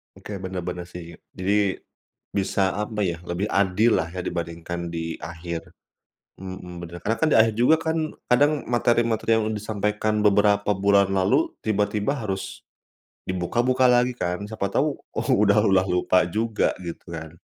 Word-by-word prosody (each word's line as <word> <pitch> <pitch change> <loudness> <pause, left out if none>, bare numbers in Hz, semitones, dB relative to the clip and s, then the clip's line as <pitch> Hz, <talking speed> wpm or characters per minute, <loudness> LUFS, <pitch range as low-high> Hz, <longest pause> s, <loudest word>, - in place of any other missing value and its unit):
Oke, 100 -2 -7
bener-bener 90 -1 -5
sih. 85 -2 -10 0.2
Jadi, 100 +1 +1 0.6
bisa 95 -1 +1
apa 105 +1 -2
ya, 85 -3 -1
lebih 90 +4 -2
adil 100 +4 +3
lah 85 - -2
ya 90 0 -5
dibandingkan 85 0 -4
di 80 -1 -4
akhir, 85 +1 -6 0.7
mhm, 95 -2 -8
bener. 85 0 -8
Karena 115 +2 0
kan 160 - +3
di - - +5
akhir 110 -1 +4
juga 125 +6 +6
kan 160 -1 -1 0.2
kadang 145 +4 +3
materi-materi 115 -2 +2
yang 110 0 -1
disampaikan 105 0 -1
beberapa 105 0 +3
bulan 100 0 +3
lalu 95 +11 +2
tiba-tiba 105 +1 0
harus 95 -2 -5 0.6
dibuka-buka 120 +8 +1
lagi 125 0 +3
kan, 90 -3 -3
siapa 105 -2 -3
tahu - - 0
u - - -5 0.2
udah 105 0 +4
udah 95 -1 +4
lupa 90 0 +3
juga 110 +3 +1
gitu 85 0 -8
kan. 80 0 -7
100 Hz, 150 wpm, -24 LUFS, 90-110 Hz, 0.7 s, juga